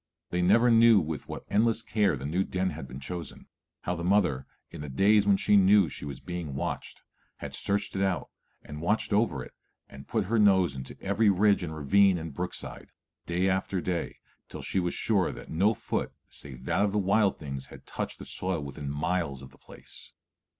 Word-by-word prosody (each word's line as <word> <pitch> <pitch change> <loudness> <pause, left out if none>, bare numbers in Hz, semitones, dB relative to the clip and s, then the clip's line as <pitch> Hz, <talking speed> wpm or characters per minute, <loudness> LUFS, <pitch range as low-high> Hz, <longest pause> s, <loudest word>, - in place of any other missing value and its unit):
They 90 - 0
never 115 +7 +5
knew 115 -2 +7
with 80 -3 -5
what - - -7
endless 115 +2 +2
care 105 -9 +1
the 65 - -7
new 85 +6 0
den 95 0 -1
had 65 - -7
been 65 +2 -8
chosen; 85 +2 -7 0.4
how 90 - -2
the 85 - -5
mother, 90 -9 +2 0.2
in - - -8
the 75 - -6
days 100 +8 +4
when 100 -1 +5
she 105 - +3
knew 100 -2 +5
she - - -7
was 70 -3 -7
watched, 85 -6 -5 0.3
had - - -7
searched 100 0 -1
it 95 - -1
out 95 -6 -1 0.3
and 75 +1 -8
watched 105 +5 0
over 100 - +1
it - - -13 0.3
and 70 0 -12
put 110 -4 0
her 115 +4 +1
nose 95 -8 +4
to - - -10
every 100 +2 +3
ridge 100 +1 +3
and 80 -3 -5
ravine 95 +6 +4
and 80 -2 -6
brook 90 +5 -4
side, - - -8 0.4
day 90 +2 +1
after 95 0 0
day, 90 -1 -3 0.3
till - - -8
she 95 - -1
was 90 -1 -1
sure 100 -6 +1
that - - -10
no 100 +7 +2
foot - - -3 0.2
save 65 -3 -8
that - - +1
of 100 -1 0
the - - +1
wild 100 +1 +2
things 70 -2 -6
had - - -14
touched - - -5
the - - -10
soil 90 -2 -2
within 70 0 -6
miles 75 -2 -2
of 65 - -12
the - - -20
place. - - -13
90 Hz, 205 wpm, -28 LUFS, 75-100 Hz, 0.4 s, knew